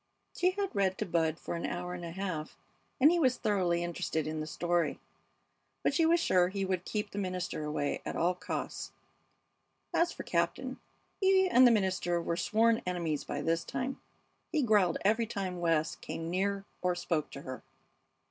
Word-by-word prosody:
She 360 Hz, -, +3 dB
had 395 Hz, +1 st, -3 dB
read 190 Hz, -2 st, +2 dB
to 215 Hz, -, -1 dB
Bud 165 Hz, -3 st, +1 dB
for -, -, -5 dB
an 170 Hz, -, -4 dB
hour 180 Hz, 0 st, -3 dB
and 180 Hz, -1 st, -6 dB
a 170 Hz, -, -4 dB
half, 165 Hz, -3 st, -4 dB, 0.4 s
and 290 Hz, +4 st, +7 dB
he 350 Hz, -, +2 dB
was 255 Hz, -5 st, +3 dB
thoroughly 185 Hz, -6 st, +1 dB
interested 160 Hz, -2 st, -2 dB
in 155 Hz, 0 st, -3 dB
the 155 Hz, -, -4 dB
story; 170 Hz, -1 st, 0 dB, 0.8 s
but -, -, +2 dB
she 320 Hz, +3 st, +4 dB
was 340 Hz, +1 st, +4 dB
sure 180 Hz, -, +4 dB
he 195 Hz, +1 st, -2 dB
would 185 Hz, -1 st, -1 dB
keep 210 Hz, -1 st, -2 dB
the 205 Hz, -, -4 dB
minister 185 Hz, -4 st, -3 dB
away 150 Hz, -1 st, -1 dB
at -, -, -4 dB
all 175 Hz, +2 st, +2 dB
costs. 180 Hz, 0 st, -5 dB, 1.0 s
As 340 Hz, +1 st, +3 dB
for -, -, -7 dB
Captain, -, -, -1 dB, 0.4 s
he 380 Hz, -1 st, +5 dB
and 255 Hz, -7 st, +7 dB
the -, -, +6 dB
minister 185 Hz, -4 st, +1 dB
were 170 Hz, 0 st, -1 dB
sworn 225 Hz, +5 st, +3 dB
enemies 170 Hz, -5 st, -1 dB
by 145 Hz, -, -4 dB
this 165 Hz, +1 st, +1 dB
time. 260 Hz, +2 st, -4 dB, 0.5 s
He 310 Hz, -4 st, +2 dB
growled 205 Hz, -7 st, +4 dB
every 220 Hz, +3 st, +3 dB
time 190 Hz, -4 st, -3 dB
West 165 Hz, -2 st, +1 dB
came 165 Hz, +1 st, -5 dB
near 195 Hz, +2 st, 0 dB, 0.2 s
or 180 Hz, -1 st, +1 dB
spoke 165 Hz, -3 st, -1 dB
to 140 Hz, -, -9 dB
her. 130 Hz, 0 st, -6 dB
180 Hz, 185 wpm, -31 LUFS, 170-220 Hz, 1.0 s, and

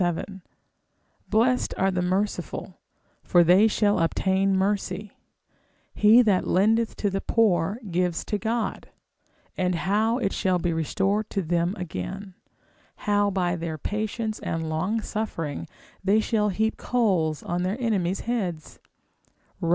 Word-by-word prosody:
7, 180 Hz, +2 st, -2 dB, 0.9 s
Blessed 245 Hz, +4 st, +2 dB
are 195 Hz, 0 st, +2 dB
the 180 Hz, -1 st, -1 dB
merciful, 190 Hz, +3 st, -2 dB, 0.4 s
for 175 Hz, -1 st, +4 dB
they 185 Hz, +6 st, +6 dB
shall 205 Hz, -2 st, +2 dB
obtain 190 Hz, +3 st, +1 dB
mercy: 200 Hz, +1 st, -1 dB, 0.8 s
he 220 Hz, +4 st, +6 dB
that 200 Hz, -5 st, +2 dB
lendeth 220 Hz, +4 st, +2 dB
to 205 Hz, -, -1 dB
the 195 Hz, +1 st, -2 dB
poor, 200 Hz, -2 st, +1 dB
gives 175 Hz, -1 st, 0 dB
to 210 Hz, -, -2 dB
God, 225 Hz, +1 st, -2 dB, 0.7 s
and 180 Hz, -1 st, 0 dB
how 210 Hz, +7 st, +1 dB
it 200 Hz, -6 st, -1 dB
shall 185 Hz, -3 st, +1 dB
be 175 Hz, -1 st, -1 dB
restored 195 Hz, +6 st, 0 dB
to 195 Hz, -, -2 dB
them 170 Hz, +3 st, 0 dB
again; 180 Hz, -, -6 dB, 0.7 s
how 205 Hz, 0 st, +3 dB
by 180 Hz, -2 st, 0 dB
their 165 Hz, -2 st, -4 dB
patience 215 Hz, +4 st, -3 dB
and 165 Hz, -1 st, -3 dB
long 180 Hz, +8 st, -1 dB
suffering 175 Hz, -10 st, -4 dB, 0.4 s
they 200 Hz, +3 st, +4 dB
shall 215 Hz, -1 st, +1 dB
heap 220 Hz, +3 st, 0 dB
coals 185 Hz, -11 st, 0 dB
on 175 Hz, +1 st, -2 dB
their 185 Hz, +4 st, -1 dB
enemies' 195 Hz, -6 st, 0 dB
heads, 185 Hz, -, -3 dB, 0.8 s
Rom. 170 Hz, -, -2 dB
195 Hz, 135 wpm, -25 LUFS, 175-215 Hz, 0.9 s, they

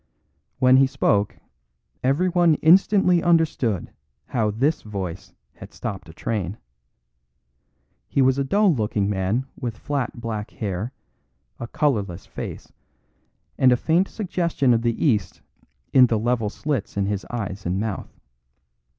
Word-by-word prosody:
When 130 Hz, 0 st, +5 dB
he 135 Hz, 0 st, +5 dB
spoke 105 Hz, -5 st, +1 dB, 0.7 s
everyone 170 Hz, +4 st, +3 dB
instantly 180 Hz, +2 st, +4 dB
understood 160 Hz, -, +1 dB, 0.4 s
how 110 Hz, -4 st, +1 dB
this 135 Hz, +9 st, 0 dB
voice 95 Hz, -3 st, -6 dB, 0.2 s
had -, -, -12 dB
stopped 95 Hz, -4 st, -6 dB
a -, -, -9 dB
train. 100 Hz, 0 st, -3 dB, 1.5 s
He -, -, -1 dB
was 130 Hz, 0 st, +4 dB
a -, -, +2 dB
dull 200 Hz, +6 st, +3 dB
looking 105 Hz, -5 st, -1 dB
man 100 Hz, +6 st, 0 dB
with 115 Hz, -4 st, -5 dB
flat 140 Hz, -3 st, -3 dB
black 110 Hz, -2 st, -4 dB
hair, 105 Hz, +2 st, -4 dB, 0.7 s
a 120 Hz, -, -5 dB
colourless 110 Hz, -, -1 dB
face, -, -, -8 dB, 0.9 s
and 130 Hz, -1 st, +6 dB
a 125 Hz, -, +4 dB
faint 170 Hz, +8 st, +2 dB
suggestion 170 Hz, -, 0 dB
of 115 Hz, -, +2 dB
the 115 Hz, +4 st, -1 dB
East 105 Hz, -10 st, 0 dB, 0.5 s
in 130 Hz, -1 st, +7 dB
the 115 Hz, -, +1 dB
level 115 Hz, -1 st, 0 dB
slits 130 Hz, -4 st, -3 dB
in 100 Hz, -, +1 dB
his 100 Hz, -1 st, -2 dB
eyes 100 Hz, -6 st, -4 dB
and 90 Hz, +2 st, -1 dB
mouth. 110 Hz, -2 st, -5 dB
120 Hz, 135 wpm, -23 LUFS, 105-145 Hz, 1.5 s, in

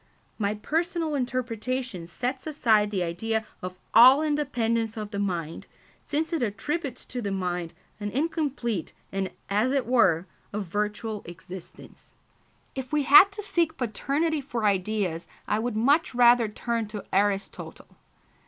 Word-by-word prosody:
My 205 Hz, 0 st, 0 dB
personal 325 Hz, -, -1 dB
interpretation 250 Hz, -6 st, -2 dB
sets 255 Hz, -, -4 dB
aside 225 Hz, -9 st, +3 dB
the 195 Hz, -3 st, -1 dB
idea 220 Hz, +6 st, -2 dB, 0.2 s
of 185 Hz, 0 st, -5 dB, 0.2 s
all 260 Hz, +6 st, +8 dB
independence 230 Hz, -7 st, 0 dB
of 210 Hz, -1 st, -5 dB
the 200 Hz, -, -3 dB
mind, 170 Hz, -5 st, -3 dB, 0.4 s
since 320 Hz, +3 st, -2 dB
it 330 Hz, -, 0 dB
attributes 250 Hz, +5 st, -3 dB
to 250 Hz, -, -5 dB
the 205 Hz, -, -2 dB
mind 180 Hz, -3 st, -3 dB, 0.2 s
an 205 Hz, 0 st, -3 dB
incomplete 270 Hz, -, -2 dB, 0.2 s
and, 195 Hz, -1 st, -2 dB, 0.2 s
as 210 Hz, +6 st, +1 dB
it 275 Hz, -2 st, +1 dB
were, 190 Hz, -9 st, +3 dB, 0.3 s
a 210 Hz, -, -1 dB
virtual 210 Hz, +3 st, -3 dB
existence. 175 Hz, +1 st, -11 dB, 0.6 s
If 260 Hz, -1 st, -6 dB
we 300 Hz, -1 st, +2 dB
had 295 Hz, +9 st, +8 dB
to 420 Hz, +1 st, -6 dB
seek 335 Hz, -5 st, 0 dB
paternity 280 Hz, +6 st, -1 dB
for 245 Hz, -5 st, -3 dB
ideas 190 Hz, -3 st, 0 dB, 0.2 s
I 210 Hz, -, +1 dB
would 235 Hz, 0 st, -2 dB
much 275 Hz, +5 st, +2 dB
rather 240 Hz, -1 st, +6 dB
turn 230 Hz, +1 st, -2 dB
to 210 Hz, -1 st, -7 dB
Aristotle. 200 Hz, 0 st, -1 dB
225 Hz, 140 wpm, -26 LUFS, 200-275 Hz, 0.6 s, all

